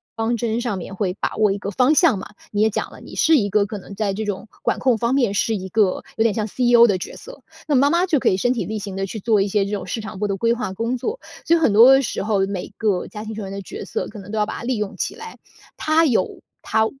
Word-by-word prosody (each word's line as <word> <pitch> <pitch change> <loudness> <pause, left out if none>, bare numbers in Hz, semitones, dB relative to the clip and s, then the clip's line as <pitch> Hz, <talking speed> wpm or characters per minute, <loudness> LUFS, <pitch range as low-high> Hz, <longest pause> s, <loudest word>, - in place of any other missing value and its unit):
方 230 +1 0
针 230 +1 -1
上 235 -5 -2
面 190 +2 -7
会 185 -2 -1
把 - - -2
握 215 -2 +3
一 195 - -1
个 200 0 -5
方 255 +9 +3
向 280 - +4
嘛。 195 - -10 0.2
你 205 0 0
也 220 - +4
讲 - - -3
了， - - -13
你 - - -11
是 320 0 +4
一 205 -7 +2
个 205 0 +2
可 205 0 -6
能 195 +1 -11
在 205 -1 -1
这 220 +3 -3
种 205 +1 -4
管 - - 0
控 255 -3 +2
方 235 +4 0
面， 240 -7 +2
是 220 +2 +1
一 190 -1 -5
个 205 -2 +1
有 - - -1
点 225 -1 +4
像 215 -2 -1
CEO 240 +1 +5
的 195 -5 +1
角 - - -7
色。 - - -12 0.3
那 295 - +1
妈 280 +2 +4
妈 345 +4 +3
就 310 -6 +2
可 - - +3
以 185 - +1
身 245 +5 +1
体 240 - -2
力 220 - -4
行 200 -2 -6
地， 195 0 -2
去 220 - -6
做 215 0 +2
一 195 - +1
些 200 0 +1
这 200 - -5
种 200 -3 -2
市 225 - -3
场 195 -2 -8
部 210 - 0
的 195 -1 -2
规 230 +3 +2
划 235 -5 -3
工 230 +6 -2
作。 440 - -4 0.3
所 335 - +4
以 - - -1
很 235 -10 +3
多 255 +5 +8
时 270 - -2
候， 200 -2 +1
每 195 0 -5
个 205 -5 0
家 210 0 -8
庭 220 - -5
成 215 -1 -6
员 195 - -6
的 195 - -5
角 415 - -7
色， - - -3
可 210 - -10
能 195 +2 -10
都 220 - -3
要 210 - +2
把 - - -6
它 - - -7
利 250 +2 -1
用 210 -2 -3
起 - - -3
来。 455 0 -9 0.4
他 320 +1 +3
有 225 -9 0 0.2
他 220 0 +1
220 Hz, 330 characters per minute, -21 LUFS, 200-245 Hz, 0.4 s, 多